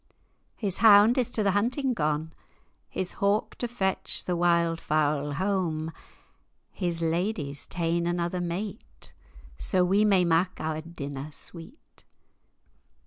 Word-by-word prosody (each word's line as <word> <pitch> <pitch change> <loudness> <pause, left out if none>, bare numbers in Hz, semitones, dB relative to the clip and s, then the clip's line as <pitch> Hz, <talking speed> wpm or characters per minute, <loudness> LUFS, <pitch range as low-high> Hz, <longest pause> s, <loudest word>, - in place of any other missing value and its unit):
His 195 -4 -2
hound 215 +1 +7
is 250 - +1
to 220 -3 -1
the 200 - +3
hunting 250 +6 0
gane, 155 -3 -1 0.6
His 185 - -1
hawk, 200 +2 +1
to 240 - -1
fetch 195 -5 -1
the 180 - -1
wild 170 -1 +2
fowl 145 -1 0
hame, 165 -2 -1 0.8
His 170 -3 -2
lady's 165 -4 -2
ta'en 170 0 -1
another 175 +1 -1
mate, 175 - -6 0.5
Sa 185 -1 +2
we 195 +4 +3
may 195 -4 +4
mak 170 +2 +1
our 155 0 -2
dinner 145 -3 -7
sweet. 170 - -11
175 Hz, 125 wpm, -27 LUFS, 160-200 Hz, 0.8 s, hound